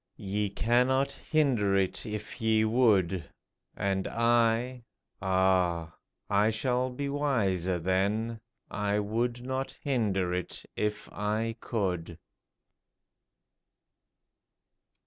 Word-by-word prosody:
Ye 100 Hz, +1 st, -2 dB
cannot 125 Hz, +6 st, +2 dB
hinder 125 Hz, -11 st, +1 dB
it 95 Hz, +4 st, -1 dB
if 105 Hz, +3 st, -6 dB
ye 110 Hz, -1 st, +3 dB
would; 100 Hz, -, +2 dB, 0.5 s
And 95 Hz, -1 st, 0 dB
I 115 Hz, +1 st, +2 dB, 0.2 s
— -, -, -49 dB
ah! 95 Hz, -3 st, +1 dB, 0.3 s
I 105 Hz, +1 st, +3 dB
shall 125 Hz, +3 st, 0 dB
be 140 Hz, +3 st, -4 dB
wiser 105 Hz, -, 0 dB
then 100 Hz, +6 st, 0 dB
— -, -, -42 dB, 0.2 s
I 105 Hz, -, +2 dB
would 120 Hz, +4 st, -1 dB
not 130 Hz, +1 st, -3 dB
hinder 100 Hz, -9 st, 0 dB
it 90 Hz, -1 st, -4 dB
if 105 Hz, 0 st, -2 dB
I 110 Hz, +2 st, -1 dB
could 90 Hz, -8 st, -2 dB
110 Hz, 100 wpm, -29 LUFS, 95-120 Hz, 0.5 s, ye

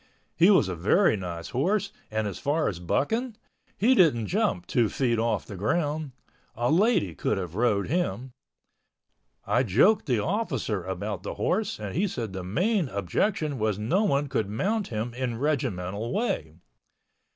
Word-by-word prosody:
He 175 Hz, +4 st, +5 dB
was 190 Hz, -, +5 dB
a 95 Hz, -, -2 dB
very 110 Hz, -, +3 dB
nice 85 Hz, -4 st, -6 dB
horse 185 Hz, -, 0 dB, 0.2 s
and 110 Hz, 0 st, -1 dB
as 100 Hz, -, -5 dB
far 155 Hz, +3 st, 0 dB
as 85 Hz, -, -3 dB
bucking, 220 Hz, -, -1 dB, 0.4 s
he 235 Hz, +6 st, +4 dB
didn't 150 Hz, -, +4 dB
jump 200 Hz, -, 0 dB
two 120 Hz, -6 st, +1 dB
feet 120 Hz, +1 st, 0 dB
off 115 Hz, -2 st, 0 dB
the 100 Hz, -, -8 dB
ground. 150 Hz, -, -1 dB, 0.4 s
A 120 Hz, +4 st, 0 dB
lady 180 Hz, -, +3 dB
could 105 Hz, -, -1 dB
have 90 Hz, -4 st, -4 dB
rode 105 Hz, -2 st, +1 dB
him. 130 Hz, -, -1 dB, 1.1 s
I 125 Hz, -, +2 dB
joked 130 Hz, -, +3 dB
the 125 Hz, -4 st, +2 dB
officer 135 Hz, -, -1 dB
about 95 Hz, +1 st, -4 dB
the -, -, -5 dB
horse 210 Hz, -, -1 dB
and 105 Hz, -2 st, -5 dB
he 195 Hz, +6 st, +1 dB
said 115 Hz, -, -4 dB
the 95 Hz, -1 st, -5 dB
main 175 Hz, -, 0 dB
objection 140 Hz, -, -1 dB
was 105 Hz, -2 st, 0 dB
no 120 Hz, -, +1 dB
one 145 Hz, -8 st, +2 dB
could 125 Hz, -7 st, -2 dB
mount 200 Hz, -, -1 dB
him 115 Hz, +1 st, -3 dB
in 125 Hz, -2 st, -3 dB
regimental 115 Hz, -7 st, -2 dB
way. 80 Hz, -, -2 dB
125 Hz, 160 wpm, -27 LUFS, -, 1.1 s, He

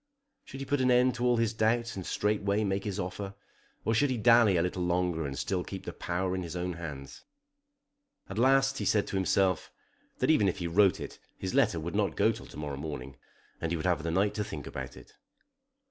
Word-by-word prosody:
Should 135 Hz, -, -8 dB
he -, -, -4 dB
put 140 Hz, +1 st, 0 dB
an 130 Hz, -, +3 dB
end 125 Hz, +1 st, +4 dB
to 125 Hz, 0 st, -2 dB
all 120 Hz, -1 st, +3 dB
his 115 Hz, -1 st, +1 dB
doubts 115 Hz, +1 st, +1 dB
and 95 Hz, -, -5 dB
straightway 105 Hz, 0 st, 0 dB
make 95 Hz, 0 st, -1 dB
his 100 Hz, -1 st, -3 dB
offer, 95 Hz, +2 st, -4 dB, 0.5 s
or 110 Hz, -, +2 dB
should 140 Hz, +5 st, +3 dB
he 130 Hz, -, 0 dB
dally 115 Hz, -4 st, +5 dB
a 85 Hz, -, +2 dB
little 90 Hz, 0 st, -2 dB
longer 90 Hz, -3 st, 0 dB
and 70 Hz, 0 st, -6 dB
still 90 Hz, +4 st, -1 dB
keep 95 Hz, 0 st, -7 dB
the -, -, -5 dB
power 90 Hz, +1 st, -2 dB
in 95 Hz, -, -2 dB
his 85 Hz, -1 st, -6 dB
own 90 Hz, 0 st, -2 dB
hands? 75 Hz, -5 st, -8 dB, 1.0 s
At 95 Hz, +3 st, -5 dB
last 135 Hz, +1 st, +4 dB
he -, -, -2 dB
said 105 Hz, -2 st, +3 dB
to -, -, -4 dB
himself 95 Hz, -1 st, +1 dB, 0.5 s
that -, -, +3 dB
even 105 Hz, -10 st, +4 dB
if -, -, -3 dB
he 85 Hz, -, -4 dB
wrote 95 Hz, +3 st, +4 dB
it -, -, -8 dB, 0.2 s
his 95 Hz, -, -4 dB
letter 110 Hz, -11 st, +3 dB
would 85 Hz, +2 st, -5 dB
not -, -, 0 dB
go -, -, +4 dB
till -, -, -9 dB
to -, -, -12 dB
morrow 75 Hz, -2 st, -4 dB
morning, 70 Hz, -3 st, -6 dB, 0.4 s
and 85 Hz, -, -2 dB
he -, -, +1 dB
would 80 Hz, -, -4 dB
have 90 Hz, -4 st, +2 dB
the 85 Hz, -, -3 dB
night 100 Hz, +5 st, +2 dB
to 105 Hz, -, -1 dB
think 105 Hz, -, -7 dB
about -, -, -7 dB
it. -, -, -15 dB
95 Hz, 230 wpm, -30 LUFS, 85-115 Hz, 1.0 s, dally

